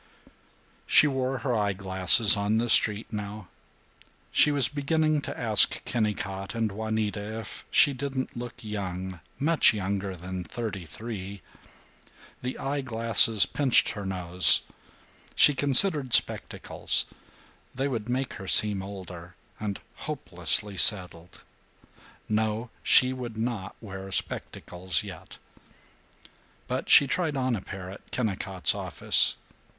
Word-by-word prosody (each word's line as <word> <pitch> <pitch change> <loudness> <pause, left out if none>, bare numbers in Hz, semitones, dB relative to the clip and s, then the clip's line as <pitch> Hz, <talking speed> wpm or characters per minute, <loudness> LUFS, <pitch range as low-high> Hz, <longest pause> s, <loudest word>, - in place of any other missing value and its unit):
She - - +5
wore 135 -2 -2
her 125 +1 -3
eye 105 -2 -1
glasses 95 +2 +5
on 100 +2 -1
the 120 +1 -2
street 110 0 +3
now. 105 -2 -8 0.8
She 150 - +3
was 140 -4 +3
beginning 155 +1 -1
to - - -8
ask 110 -3 +2
Kennicott 100 -3 -4
and 115 -2 -2
Juanita 110 0 -5
if 110 -4 -9
she 145 - +3
didn't 130 0 -6
look 120 0 -9
young, 95 -4 -7 0.2
much 155 -5 +2
younger 100 -1 -4
than 90 +1 -8
thirty 100 -3 -7
three. 100 +1 -9 1.0
The 125 +1 -6
eye 140 +1 -4
glasses 115 -4 +2
pinched 130 +5 +1
her 105 - -7
nose. 90 -2 +6 0.7
She 145 - +5
considered 140 - +3
spectacles. - - +1 0.7
They 135 +2 -2
would 120 -4 -5
make 130 +2 -3
her 95 - -10
seem 105 -1 +4
older, 90 -3 -11 0.2
and 105 -2 -5 0.2
hopelessly 105 -2 -1
settled. 90 -3 +3 0.8
No! 110 +2 -3
She 130 0 +4
would 120 -3 -8
not 110 -4 -5
wear 95 -3 -10
spectacles 90 -3 -2
yet. - - -12 1.3
But - - -5
she - - +7
tried 155 +1 -3
on 130 -2 -1
a 100 - -6
pair 95 -1 -10
at 100 - -15
Kennicott's 95 -5 0
office. - - +2
110 Hz, 125 wpm, -25 LUFS, 95-125 Hz, 1.3 s, she